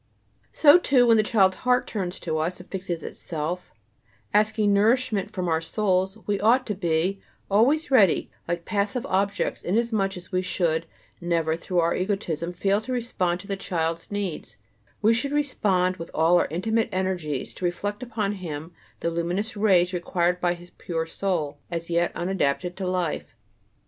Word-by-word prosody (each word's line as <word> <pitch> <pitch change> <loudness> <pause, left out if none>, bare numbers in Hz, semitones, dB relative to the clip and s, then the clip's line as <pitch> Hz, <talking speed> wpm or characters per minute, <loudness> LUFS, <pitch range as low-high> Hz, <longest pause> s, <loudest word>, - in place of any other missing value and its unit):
So, 305 +3 +7
too, 260 -7 +4
when 230 -1 +5
the - - +5
child's 200 -4 +3
heart 250 0 +2
turns 185 -4 -2
to 160 -2 -2
us, 170 +4 -2
and 180 - -12
fixes 180 -3 -4
itself, 170 +3 -4 0.6
asking 210 0 +3
nourishment 215 -1 +2
from 185 -4 -3
our 160 -1 +1
souls, 190 +2 0
we 205 -1 0
ought 245 +5 +4
to 210 - -2
be 180 +1 0 0.3
always 275 +10 +3
ready, 205 -10 +4 0.2
like 170 0 -3
passive 210 +4 -1
objects, 195 +1 0
inasmuch 205 -1 0
as 180 - -11
we 185 -1 +1
should 165 -3 0 0.3
never, 165 -2 0
through 175 +1 0
our 170 +1 +2
egotism, 175 -4 -2
fail 195 +4 +1
to 255 - -7
respond 185 -8 -1
to 200 - -14
the 200 - -1
child's 165 -3 -2
needs; 190 - -4 0.5
we 220 +2 +5
should 250 +5 0
respond 195 -11 +1
with 165 0 -7
all 165 +3 +4
our - - +1
intimate 220 +7 0
energies, 185 -7 -2
to 185 - -5
reflect 205 +5 -2
upon 220 -5 -2
him 160 -1 -6 0.3
the 170 - 0
luminous 175 +6 -1
rays 190 -4 +3
required 175 0 0
by 175 0 +1
his 175 0 -14
pure 165 -2 -3
soul, 165 -5 -2
as 170 0 -2
yet 170 +1 +2
unadapted 175 -1 -1
to 190 -1 -4
life. 180 -9 -2
185 Hz, 165 wpm, -25 LUFS, 170-210 Hz, 0.6 s, So